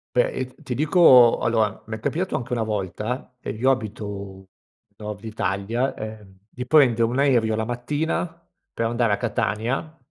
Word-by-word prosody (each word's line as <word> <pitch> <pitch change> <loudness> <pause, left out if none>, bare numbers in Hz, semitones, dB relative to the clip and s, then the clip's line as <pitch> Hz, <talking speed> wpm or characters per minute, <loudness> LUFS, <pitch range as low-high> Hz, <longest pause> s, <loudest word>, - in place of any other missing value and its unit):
Beh, 125 - +3
io 130 -1 -5
ti 125 - -4
dico 140 -5 +6
allora, 110 -3 0
mi 110 - -4
è 110 - -9
capitato 180 +10 -2
anche 125 0 -3
una 115 - 0
volta, 110 +4 -3
ed - - -5
io 130 +3 +4
abito 100 -5 -5 0.5
nord 105 -1 -7
Italia, 110 +3 -2
ehm, 105 -3 -9
di 125 0 -7
prendere 130 -7 +5
un 120 +3 -2
aereo 120 -6 +3
la 110 0 -1
mattina 150 +8 -2 0.3
per 115 - -2
andare 115 -1 +1
a - - +1
Catania, 120 +7 -2
115 Hz, 160 wpm, -23 LUFS, 110-130 Hz, 0.5 s, dico